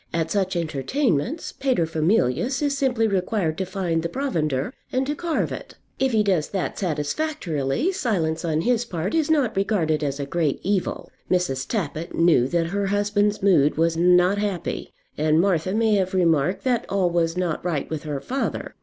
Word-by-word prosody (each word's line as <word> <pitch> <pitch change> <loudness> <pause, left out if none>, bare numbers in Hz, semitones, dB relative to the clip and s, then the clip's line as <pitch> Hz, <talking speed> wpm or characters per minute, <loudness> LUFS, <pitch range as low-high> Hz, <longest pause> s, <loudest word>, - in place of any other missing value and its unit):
At 165 -1 -1
such 190 -2 0
entertainments 170 - -1
Paterfamilias 170 - +1
is 285 -1 +1
simply 250 -5 +1
required 190 -4 0
to 190 - -2
find 180 -3 -1
the 170 - -3
provender 165 - -1 0.2
and 260 +1 0
to 290 - -1
carve 330 +1 -1
it. - - -7 0.2
If 265 -1 +2
he 220 -2 +3
does 185 -7 +1
that 190 -2 -3
satisfactorily, 170 - -1
silence 185 - -1
on 160 -2 0
his 240 +3 +1
part 185 -4 -3
is 320 -2 +1
not 285 -8 +2
regarded 170 -7 +1
as 140 -1 -2
a 140 - -2
great 155 -1 -1
evil. 195 -1 -1 0.2
Mrs. 165 -8 0
Tappitt 170 -6 -3
knew 165 -7 +4
that 170 +3 0
her 200 0 0
husband's 205 0 +1
mood 155 -8 +4
was 165 0 +2
not 180 +3 +4
happy, 200 -5 -3 0.3
and 155 +1 +3
Martha 185 -1 +1
may 220 +1 +2
have 190 -1 -1
remarked 170 -1 +2
that 250 -3 0
all 185 -2 +1
was 170 0 0
not 175 -4 -1
right 170 -5 -1
with 155 -2 -4
her 150 -2 -4
father. 265 - -3
180 Hz, 170 wpm, -23 LUFS, 160-220 Hz, 0.3 s, knew